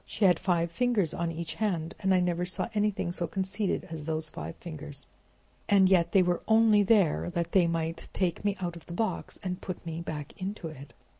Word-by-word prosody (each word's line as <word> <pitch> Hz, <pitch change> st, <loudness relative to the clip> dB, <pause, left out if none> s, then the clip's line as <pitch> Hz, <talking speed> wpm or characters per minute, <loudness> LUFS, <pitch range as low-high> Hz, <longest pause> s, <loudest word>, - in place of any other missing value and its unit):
She 215 Hz, -, 0 dB
had 180 Hz, -3 st, +5 dB
five 170 Hz, -3 st, +1 dB
fingers 220 Hz, -4 st, +1 dB
on 170 Hz, 0 st, -1 dB
each 165 Hz, 0 st, -5 dB
hand, 170 Hz, -6 st, 0 dB
and 190 Hz, -, +1 dB
I 185 Hz, -, +5 dB
never 175 Hz, 0 st, 0 dB
saw 180 Hz, -, -2 dB
anything 210 Hz, -4 st, 0 dB
so 175 Hz, -1 st, -2 dB
conceited 190 Hz, +3 st, -1 dB
as 155 Hz, -2 st, -5 dB
those 160 Hz, 0 st, -1 dB
five 80 Hz, +2 st, -7 dB
fingers. 150 Hz, -4 st, -5 dB, 0.6 s
And 195 Hz, -2 st, +6 dB
yet 170 Hz, -3 st, +4 dB
they 190 Hz, -, +5 dB
were 175 Hz, -1 st, 0 dB
only 220 Hz, -1 st, +6 dB
there 200 Hz, -6 st, +3 dB
that 170 Hz, 0 st, -1 dB
they 180 Hz, -3 st, +4 dB
might 165 Hz, 0 st, -2 dB
take 180 Hz, -1 st, -1 dB
me 205 Hz, -1 st, 0 dB
out 175 Hz, -2 st, -3 dB
of 170 Hz, -, -12 dB
the 170 Hz, -, -7 dB
box 220 Hz, +5 st, -2 dB
and 180 Hz, -1 st, -3 dB
put 185 Hz, -1 st, -6 dB
me 165 Hz, 0 st, -4 dB
back 150 Hz, -3 st, -6 dB
into 190 Hz, -3 st, -4 dB
it." 140 Hz, -2 st, -12 dB
175 Hz, 210 wpm, -29 LUFS, 165-195 Hz, 0.6 s, And